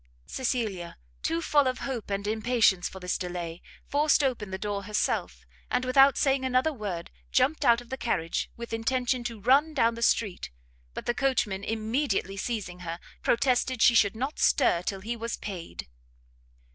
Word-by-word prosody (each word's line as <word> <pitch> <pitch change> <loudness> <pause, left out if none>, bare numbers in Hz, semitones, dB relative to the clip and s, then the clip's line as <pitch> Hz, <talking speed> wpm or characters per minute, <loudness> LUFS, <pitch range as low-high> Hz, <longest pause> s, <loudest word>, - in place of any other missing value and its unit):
Cecilia, 215 - -3 0.2
too 165 - -1
full 290 -3 +3
of 255 0 -1
hope 245 -7 -4
and 200 0 -2
impatience 220 -3 +2
for 190 - -10
this 180 -1 -2
delay, 175 -2 -5 0.3
forced 295 0 +3
open 240 -7 -1
the 190 - -4
door 200 0 -3
herself, 210 +1 -1 0.2
and 255 - 0
without 270 +1 +5
saying 270 -1 +2
another 260 +4 +2
word, 200 -9 -5 0.2
jumped 305 - +2
out 235 -3 +5
of 240 - -16
the 265 - -4
carriage, 165 -10 -1
with 235 0 -7
intention 245 +2 0
to 230 -2 -4
run 280 +8 +3
down 230 -4 +3
the 230 - -8
street; 205 - +1 0.5
but - - -5
the 240 - +1
coachman 225 -8 0
immediately 220 -2 -1
seizing 195 -4 -4
her, 170 -1 -5 0.2
protested 255 0 +1
she 240 - +7
should 210 -2 +4
not 265 +6 -3
stir 170 - +3
till 195 +1 -4
he 230 +4 -3
was 230 0 -4
paid. 185 - -7
230 Hz, 170 wpm, -28 LUFS, 195-255 Hz, 0.5 s, she